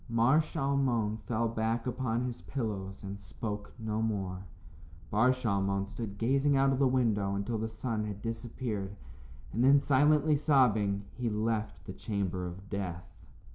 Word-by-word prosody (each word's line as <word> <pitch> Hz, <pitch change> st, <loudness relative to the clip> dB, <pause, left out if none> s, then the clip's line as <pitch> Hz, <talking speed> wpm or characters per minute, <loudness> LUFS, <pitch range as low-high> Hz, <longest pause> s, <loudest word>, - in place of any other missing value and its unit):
Mar 120 Hz, +6 st, +4 dB
Shalmon 135 Hz, -8 st, 0 dB
fell 115 Hz, -1 st, +1 dB
back 115 Hz, +1 st, -1 dB
upon 125 Hz, -1 st, -1 dB
his 125 Hz, -2 st, -5 dB
pillows 100 Hz, -7 st, -4 dB
and 100 Hz, 0 st, -6 dB
spoke 105 Hz, +3 st, -5 dB
no 110 Hz, -1 st, -2 dB
more. 95 Hz, -4 st, -2 dB, 0.6 s
Bar 110 Hz, +5 st, +4 dB
Shalmon 100 Hz, -5 st, 0 dB
stood 105 Hz, -1 st, -6 dB
gazing 135 Hz, +5 st, +3 dB
out 135 Hz, 0 st, +4 dB
of 130 Hz, -, -1 dB
the 140 Hz, -, +5 dB
window 110 Hz, -6 st, +1 dB
until 105 Hz, +3 st, -2 dB
the 110 Hz, +1 st, -2 dB
sun 110 Hz, -1 st, -2 dB
had 105 Hz, -2 st, -5 dB
disappeared, 115 Hz, -3 st, -4 dB, 0.6 s
and 115 Hz, +5 st, +1 dB
then, 140 Hz, +2 st, +7 dB
silently 150 Hz, +2 st, +4 dB
sobbing, 110 Hz, -9 st, +3 dB
he 125 Hz, -1 st, -2 dB
left 110 Hz, 0 st, -2 dB
the 95 Hz, -, -6 dB
chamber 95 Hz, -4 st, -2 dB
of 95 Hz, +3 st, -9 dB
death. 90 Hz, -4 st, -5 dB
110 Hz, 150 wpm, -31 LUFS, 100-125 Hz, 0.6 s, then